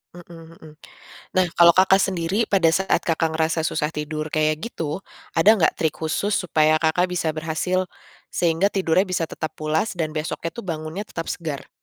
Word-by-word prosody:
Mhm 165 -1 -13
mhm. 155 -2 -14 0.6
Nah 185 -1 +3
kalau 170 -1 +8
Kakak 190 +1 +5
sendiri 190 +3 0
pada 185 -5 +3
saat 190 +3 +1
Kakak 160 -1 0
ngerasa 160 0 0
susah 150 -2 -1
tidur 155 0 -4
kayak 155 0 0
gitu, 165 -6 -4 0.3
ada 170 +5 +4
nggak 160 - +3
trik 160 -2 -1
khusus 185 +6 -1
supaya 155 -3 +2
Kakak 170 +3 +1
bisa 165 -3 -1
berhasil, 170 +4 -2 0.4
sehingga 170 +3 +1
tidurnya 190 -1 +1
bisa 175 -2 0
tetap 155 0 -5
pulas 155 +5 -1
dan 155 -2 -2
besoknya 160 +2 -4
tuh 235 - -7
bangunnya 160 +1 -5
tetap 165 -5 -6
segar? 155 -5 -6
165 Hz, 165 wpm, -22 LUFS, 155-185 Hz, 0.6 s, kalau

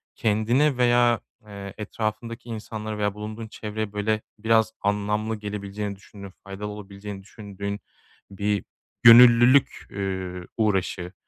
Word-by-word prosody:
kendine 120 +6 +2
veya, 120 -2 +4 0.3
eee, 100 -1 -8
etrafındaki 110 +2 -4
insanlara 110 -1 -5
veya 105 -1 0
bulunduğun 110 +2 -7
çevreye 105 -1 -5
böyle 105 +1 0 0.2
biraz 110 0 +2
anlamlı 105 +2 0
gelebileceğini 105 -1 -5
düşündüğün, 100 -1 -12
faydalı 100 +1 -6
olabileceğini 100 -1 -8
düşündüğün 100 0 -6 0.5
bir 100 +1 -1 0.4
gönüllülük, 120 +3 +7
üüü, 95 -2 -4
uğraşı 95 -4 0
105 Hz, 105 wpm, -25 LUFS, 100-110 Hz, 0.5 s, gönüllülük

